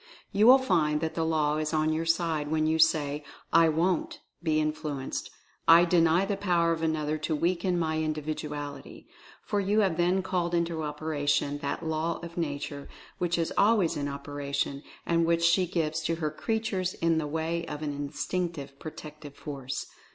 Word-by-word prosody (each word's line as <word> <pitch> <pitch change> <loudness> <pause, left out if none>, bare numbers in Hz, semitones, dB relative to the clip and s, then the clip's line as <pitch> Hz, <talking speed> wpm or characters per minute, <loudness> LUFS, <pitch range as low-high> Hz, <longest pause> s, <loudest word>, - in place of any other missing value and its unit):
You 210 +2 +4
will 260 +2 +10
find 165 - +1
that 160 -1 -2
the 165 - -1
Law 155 -2 +1
is 155 +1 -1
on 155 0 +2
your 165 +1 -2
side 165 -3 +1
when 155 0 +1
you 160 +1 +1
say, 150 -2 +2 0.3
"I 165 0 +6
WONT 170 +3 0 0.2
be 155 -2 +1
influenced— 150 -3 -3 0.4
I 170 +1 +8
DENY 170 +1 +3
the 200 -1 -1
power 175 -4 +2
of 165 -1 -1
another 155 -1 0
to 155 +1 -1
weaken 175 +3 0
my 160 -2 0
Individuality," 150 -2 -4 0.4
for 205 - -1
you 205 +2 +2
have 190 -5 +1
then 180 +2 +2
called 175 -2 -1
into 170 -1 0
operation 145 -1 -1
that 145 +3 -3
Law 160 +1 -1
of 170 0 -8
Nature 145 -3 -4 0.3
which 175 -1 0
is 165 -1 -1
always 200 -6 +4
in 145 -1 -2
operation, 140 0 -3 0.2
and 170 0 +2
which 170 0 +2
she 170 +2 +4
gives 160 -2 -1
to 165 - +1
her 155 -2 -2
creatures 195 0 -2
in 165 -1 +1
the 150 - -2
way 160 +2 -2
of 150 0 -5
an 145 -1 -2
instinctive 145 0 -4
protective 150 -2 -9
force. 140 -2 -5
160 Hz, 175 wpm, -28 LUFS, 150-170 Hz, 0.4 s, will